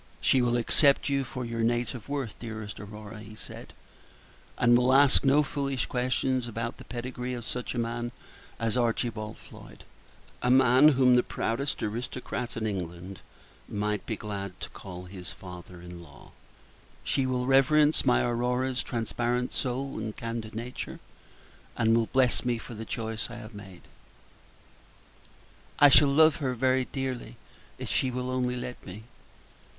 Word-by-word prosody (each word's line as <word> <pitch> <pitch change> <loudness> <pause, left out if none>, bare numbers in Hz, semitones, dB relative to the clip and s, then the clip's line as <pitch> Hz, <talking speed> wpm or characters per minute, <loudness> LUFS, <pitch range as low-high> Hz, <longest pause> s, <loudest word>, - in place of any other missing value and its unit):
"She 125 - +4
will 120 0 +2
accept 140 +4 +3
you 140 -1 +1
for 130 -1 -5
your 115 0 -4
native 120 0 -1
worth, 140 -6 -2
dearest 110 -3 -6
Aurora," 105 +1 -9
he 105 0 -11
said, - - -10 0.9
"and 120 -1 +5
will 125 +1 +4
ask 140 0 +6
no 140 +2 +5
foolish 140 -2 -2
questions 125 0 0
about 115 0 -4
the - - -11
pedigree 125 +1 -5
of 120 -2 -7
such 125 +2 -4
a - - -3
man 120 0 -2 0.5
as 115 -1 0
Archibald 115 -2 -1
Floyd - - -14 0.6
a 125 - +1
man 130 +2 +7
whom 130 -1 +6
the 125 - +6
proudest 125 +4 -2
aristocrat 120 +2 -4
in 110 - -2
England 90 -2 -4 0.5
might 105 0 -1
be 110 - -1
glad 100 -3 -6
to - - -6
call 90 -2 -9
his 90 -1 -8
father 90 -1 -10
in 90 -1 -9
law. 75 -4 -15 0.7
She 135 -1 +1
will 125 -1 0
reverence 145 +3 +4
my 125 -2 +3
Aurora's 125 +2 0
transparent 120 +1 -1
soul 135 0 -2
and 110 -1 -5
candid 115 -1 -5
nature, 120 +3 -5 0.8
and 115 -1 +4
will 115 -1 +2
bless 130 -2 +2
me 120 -1 0
for 115 - -9
the 110 0 -6
choice 110 0 -3
I 120 - -8
have 115 -1 -9
made." 95 -3 -11 1.9
"I 145 - +8
shall 145 +1 +7
love 155 +2 +5
her 130 -5 -1
very 130 +1 +2
dearly 130 -4 -4 0.4
if - - -6
she 130 - +2
will 125 0 -3
only 125 -1 0
let 125 0 -6
me. 100 +3 -9
120 Hz, 155 wpm, -28 LUFS, 110-130 Hz, 1.9 s, I